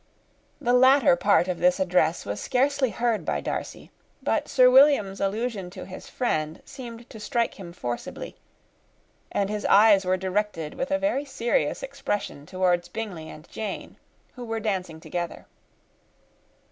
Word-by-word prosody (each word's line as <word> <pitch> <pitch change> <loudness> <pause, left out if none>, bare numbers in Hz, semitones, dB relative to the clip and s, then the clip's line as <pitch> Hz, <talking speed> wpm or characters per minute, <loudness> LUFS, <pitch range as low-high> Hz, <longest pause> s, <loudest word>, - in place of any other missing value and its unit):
_]] - - -39 0.6
The 245 - +1
latter 260 -4 +6
part 180 0 +3
of 180 -2 -2
this 180 +1 +3
address 180 -3 +1
was 100 0 -4
scarcely 270 +1 +1
heard 235 -2 0
by - - -1
Darcy; - - -5 0.3
but - - 0
Sir 255 -1 +5
William's 255 -7 +5
allusion 205 -1 -2
to 185 0 -9
his 185 - -10
friend 155 -10 -1
seemed 240 -3 -9
to 220 - -10
strike 230 +2 -1
him 175 -3 -8
forcibly, 120 -9 -6 1.0
and 200 - 0
his 210 +1 -3
eyes 205 -1 +6
were 185 0 +1
directed, 190 -4 -2
with 265 - -3
a 290 - +2
very 290 -1 0
serious 265 - -1
expression, 200 - -4
towards 180 -1 +1
Bingley 180 -7 -6
and 155 +2 -12
Jane, 215 -3 -5 0.4
who 250 - -8
were 225 -1 -3
dancing 185 -7 -3
together. 175 +1 -5
205 Hz, 150 wpm, -26 LUFS, 180-245 Hz, 1.0 s, latter